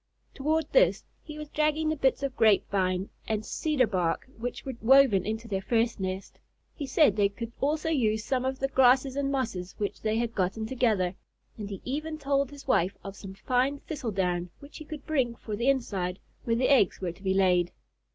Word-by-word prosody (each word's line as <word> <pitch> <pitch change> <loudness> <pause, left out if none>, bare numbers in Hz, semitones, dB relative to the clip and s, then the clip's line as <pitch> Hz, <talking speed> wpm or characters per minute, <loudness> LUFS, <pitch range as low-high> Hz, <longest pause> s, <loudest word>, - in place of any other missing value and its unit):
Toward 310 +3 0
this - - +4 0.2
he 305 -1 -9
was 300 -1 -7
dragging 305 +1 +1
the 310 - 0
bits 270 -1 +1
of 270 -2 -2
grape 215 -3 +4
vine 185 -1 0 0.2
and 215 -1 -1
cedar 295 +2 +1
bark 180 -3 -1
which 245 +2 -5
were 265 - -4
woven 240 -6 +5
into 220 +2 -3
their 195 -3 -2
first 230 +2 0
nest. 190 0 -5 0.3
He 285 - -5
said 260 -5 +4
they 205 -2 +3
could 230 +3 -7
also 305 +3 0
use 220 -8 +1
some 255 -2 0
of 265 0 -1
the 270 - 0
grasses 265 0 +4
and 280 -1 0
mosses 220 -10 -3
which 205 -1 -3
they 220 0 0
had 230 0 -1
gotten 195 +3 -1
together, 220 -7 +1 0.4
and 210 -2 -6
he 195 - -7
even 310 +4 -3
told 280 -2 0
his 285 -1 -12
wife 190 -6 +2
of 195 0 -7
some 195 -1 -9
fine 255 +7 0
thistle 290 -7 -5
down 180 -3 -1
which 285 +1 -12
he 310 - -9
could 305 -1 -8
bring 260 -7 0
for 215 -2 -6
the 240 +5 +1
inside, 195 -9 -1 0.3
where 230 - +1
the 255 +2 +2
eggs 260 -9 +4
were 180 -2 -2
to 175 - -17
be 190 -1 0
laid. 180 -2 +3
235 Hz, 205 wpm, -28 LUFS, 195-275 Hz, 0.4 s, woven